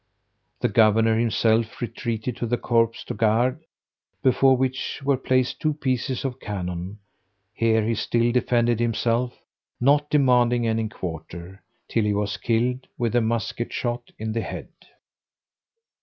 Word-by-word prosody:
The - - +3
governor 110 +1 +4
himself 115 -1 +1
retreated 115 0 -3
to 120 - -2
the 120 +2 0
corps 115 -2 +1
du - - -4
gard, 115 +7 +1 0.6
before 130 0 +4
which 130 +1 -2
were 140 0 +3
placed 130 -1 0
two 155 -1 0
pieces 130 -2 -2
of 130 -1 -3
cannon: 90 -2 -5 0.6
here 110 -1 +2
he 115 - +1
still 115 +2 +1
defended 120 -1 +2
himself, 120 +1 0 0.4
not 145 +3 +3
demanding 125 -4 +3
any 110 -1 0
quarter, 85 +1 -7 0.3
till 115 - 0
he 105 -1 +1
was 105 0 -1
killed 120 +3 0
with 120 -1 -1
a 120 - +4
musket 115 +1 -2
shot 120 0 -3
in 110 0 -4
the 115 +1 -1
head. - - -6
115 Hz, 140 wpm, -24 LUFS, 110-125 Hz, 0.6 s, governor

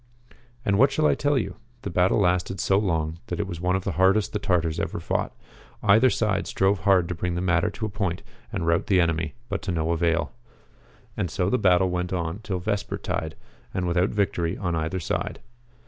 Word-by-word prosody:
And 100 0 +2
what 135 +3 +6
shall 155 +3 +1
I - - +5
tell 145 -1 +1
you? 120 - -2 0.3
The - - -4
battle 90 +4 +3
lasted 90 +1 +1
so 95 0 +3
long 80 -5 -1
that - - -4
it 105 - 0
was 85 -4 -6
one 90 +1 +1
of 95 - -1
the - - -1
hardest 95 +5 +2
the 105 - 0
Tartars 85 -4 0
ever - - -2
fought. - - -1 0.5
Either 110 +5 +6
side 105 -4 0
strove 95 +1 +1
hard 90 0 +3
to 90 - -2
bring 85 +1 -2
the - - -1
matter 90 +2 +2
to 110 +2 -5
a - - -2
point 95 -4 -2 0.3
and 95 -7 -2
rout 85 0 +1
the 95 -2 +4
enemy, 80 -2 0
but 100 -3 -3
to 95 - -3
no 80 -1 0
avail. 85 0 +1 0.8
And 90 - -2
so 90 +2 -1
the 125 - +2
battle 95 -1 +4
went 90 0 -2
on 85 +1 -2
till 100 -3 -3
vesper 100 +3 -2
tide, 80 0 -3 0.4
and 95 - 0
without 90 +3 +2
victory 90 -4 0
on 90 -3 -1
either 80 +3 -2
side. 85 - -3
90 Hz, 210 wpm, -25 LUFS, 85-100 Hz, 0.8 s, what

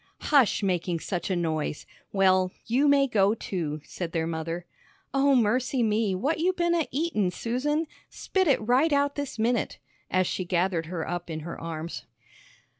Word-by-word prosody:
"Hush 265 -7 +5
making 180 -2 0
such 180 +2 -3
a 190 - +1
noise! 160 -3 -2 0.3
Well, 185 -1 +3
you 260 +6 +2
may 280 -1 +5
go, 210 -4 +3
too," 155 -8 -4
said 170 +1 -6
their 165 -1 0
mother. 165 +1 -4 0.5
"Oh, 275 0 +4
mercy 250 +2 +2
me, 215 -2 +1
what 285 - 0
you 365 +3 +2
been 345 -1 +1
a 335 -3 +1
eatin', 275 - 0
Susan? 265 - -1 0.2
Spit 375 -2 -1
it 280 - +4
right 265 +6 +4
out 285 0 +2
this 285 -5 -5
minute," 230 +1 0 0.3
as 185 0 +2
she 185 - -2
gathered 175 -2 0
her 165 -2 -4
up 175 0 -4
in 160 -1 -4
her 170 +2 -7
arms. 165 0 -5
200 Hz, 170 wpm, -27 LUFS, 175-275 Hz, 0.5 s, Hush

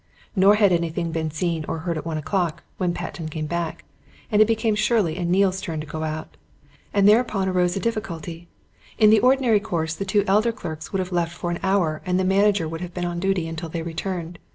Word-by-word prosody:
Nor 195 +2 +6
had 205 -2 +4
anything 170 0 0
been 160 -1 -2
seen 160 +1 -2
or 165 - -2
heard 170 -2 -1
at 155 - -5
one 160 -1 -2
o'clock, 165 +2 -1 0.2
when 180 -2 +1
Patten 165 -2 -5
came 155 0 -4
back, 170 +1 -3 0.5
and 210 0 +4
it 215 - +6
became 225 -1 +1
Shirley 210 -6 +1
and 175 -1 -2
Neale's 190 +1 +2
turn 165 -6 -4
to 155 - -5
go 155 +1 -6
out. 155 0 -5 0.5
And 200 -1 +4
thereupon 210 -3 +3
arose 180 -1 +1
a - - -1
difficulty. 175 -7 -4 0.5
In 215 -1 +6
the 220 - +6
ordinary 250 -2 +4
course 165 -5 -2
the 195 - -4
two 195 +1 +2
elder 210 +4 +3
clerks 160 -7 -7
would 195 - -1
have 185 0 -5
left 175 -1 -1
for 175 - -3
an 175 - -3
hour 185 -6 +1
and 180 0 0
the - - +1
manager 195 -2 +3
would 165 +1 -6
have 180 -1 -7
been 180 -1 -2
on 175 0 -3
duty 190 -2 0
until 165 +1 -5
they 165 0 -4
returned. 170 0 -4
180 Hz, 225 wpm, -23 LUFS, 165-200 Hz, 0.5 s, Nor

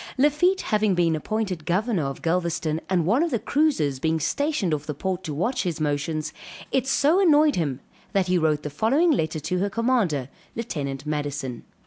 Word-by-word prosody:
Lafitte 300 +8 +3
having 210 -2 +1
been 170 -2 +2
appointed 190 0 -2
governor 185 - 0
of 135 0 -5
Galvezton 165 -2 0
and 180 -4 +2
one 225 - +3
of 340 - +1
the 240 - 0
cruisers 245 - +1
being 160 +2 0
stationed 255 - 0
off 150 0 -3
the 150 - -3
port 185 +4 -3
to 155 - -3
watch 180 - -1
his 170 -4 -2
motions, 155 +1 -2 0.4
it 265 -1 +1
so 295 +6 +3
annoyed 305 -5 +5
him 140 -6 -2 0.3
that 195 -2 +2
he 180 0 +2
wrote 155 -2 +1
the 150 - -4
following 270 - +2
letter 160 - 0
to 180 +5 -2
her 200 +2 0
commander, 215 - +1 0.3
Lieutenant 145 - -4
Madison. 145 -4 -3
175 Hz, 180 wpm, -24 LUFS, 150-235 Hz, 0.4 s, annoyed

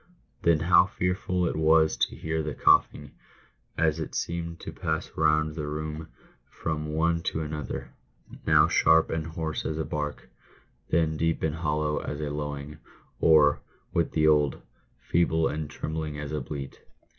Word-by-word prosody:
Then 85 -2 +3
how - - +5
fearful 90 0 -1
it - - -1
was 80 0 +4
to - - 0
hear 80 0 -2
the 75 -1 -4
coughing, 75 -1 +3 0.7
as 80 -1 +2
it 80 - -5
seemed 85 -1 -3
to - - -6
pass - - -3
round 75 0 +2
the 75 -2 -4
room 75 +1 -5 0.4
from 75 -1 -4
one 85 +1 +1
to 80 - -4
another, 75 -3 -5 0.6
now - - +6
sharp 80 0 +4
and 80 -1 -2
hoarse 80 -1 -4
as 80 - -3
a 80 - -2
bark, 75 -1 -4 0.6
then 80 -2 +1
deep 80 +1 0
and 80 -1 +1
hollow 75 -2 0
as 75 - -5
a 75 -1 -3
lowing, 75 0 -5 0.4
or 75 -2 +5 0.2
— - - -37
with 85 -2 0
the 80 -1 +2
old 75 -3 +2 0.2
— - - -39
feeble 80 -1 +3
and 75 0 -4
trembling 75 0 -4
as 75 0 -5
a 75 -1 -2
bleat. 70 +1 -7
80 Hz, 165 wpm, -27 LUFS, 75-80 Hz, 0.7 s, now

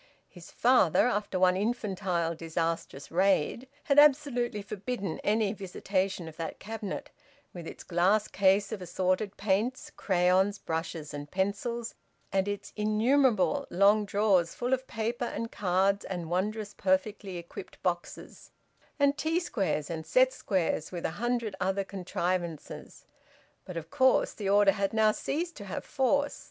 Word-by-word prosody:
His 175 -3 -14
father, 240 -8 +4
after 205 -5 -1
one 180 0 +4
infantile 190 -5 -1
disastrous 165 -3 -3
raid, 190 - +1 0.2
had 280 0 +4
absolutely 260 -7 +3
forbidden 205 -2 -4
any 210 -1 +1
visitation 190 -2 -2
of 160 - -11
that 165 -1 -5
cabinet, 215 -2 -6 0.4
with 170 -2 -8
its - - -9
glass 190 +5 +2
case 200 +2 +2
of 215 -4 -4
assorted 185 +3 -1
paints, 210 +6 -1
crayons, 190 +2 +2
brushes 160 -3 -4
and 145 0 -6
pencils, 205 +6 -2 0.4
and 190 0 +2
its 205 0 -5
innumerable 235 +4 +2
long 200 +4 +4
drawers 200 -4 +2
full 245 +2 -1
of 260 0 -1
paper 230 +2 -2
and 230 -1 -4
cards 195 +1 +1
and 175 -3 -5
wondrous 205 +3 -2
perfectly 190 0 -1
equipped 170 0 -9
boxes, 175 -1 -4 0.5
and 285 0 +2
T 325 +2 +1
squares 190 - -1
and 160 -1 -4
set 255 +10 +3
squares, 170 -5 -1
with 175 -2 -5
a - - 0
hundred 240 -4 -1
other 195 +1 0
contrivances. 180 -3 -4 0.6
But 180 - -7
of 165 -1 -7
course 260 -2 +3
the 200 -3 -3
order 200 0 +6
had 195 0 -1
now 220 -1 +4
ceased 335 +9 -3
to 205 - -8
have 190 - -5
force. 285 +1 +1
200 Hz, 145 wpm, -29 LUFS, 180-225 Hz, 0.6 s, order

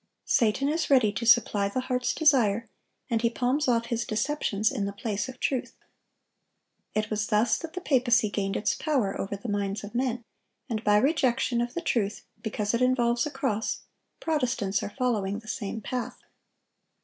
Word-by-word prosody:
Satan 245 +2 +2
is 315 +2 0
ready 255 -7 +5
to 225 +3 -3
supply 210 -4 +4
the 255 +6 -2
heart's 250 -1 -1
desire, 235 -8 +3 0.4
and 225 -1 0
he 235 - +3
palms 255 +5 0
off 235 -2 +2
his 235 0 -1
deceptions 220 -3 0
in 220 -7 -2
the 200 - -2
place 210 +2 -3
of 255 - -10
truth. 260 -3 -1 1.2
It 215 0 -1
was 210 0 0
thus 215 +2 +2
that 330 -1 -7
the 365 - -5
papacy 245 - +3
gained 195 -1 -1
its 210 - +1
power 265 -11 0
over 200 +1 -4
the 220 - -8
minds 205 -1 -2
of 205 - -8
men; 245 -1 -1 0.4
and 225 -3 -3
by 210 0 +4
rejection 260 -2 +2
of 240 0 -3
the 340 - -1
truth 220 - -1 0.2
because 210 -1 -2
it 235 - +1
involves 245 0 +2
a - - -3
cross, 225 -7 -2 0.4
Protestants 240 -11 0
are - - -4
following 210 -5 -1
the 215 0 -12
same 215 +1 -4
path. 250 +4 -4
235 Hz, 175 wpm, -27 LUFS, 210-255 Hz, 1.2 s, ready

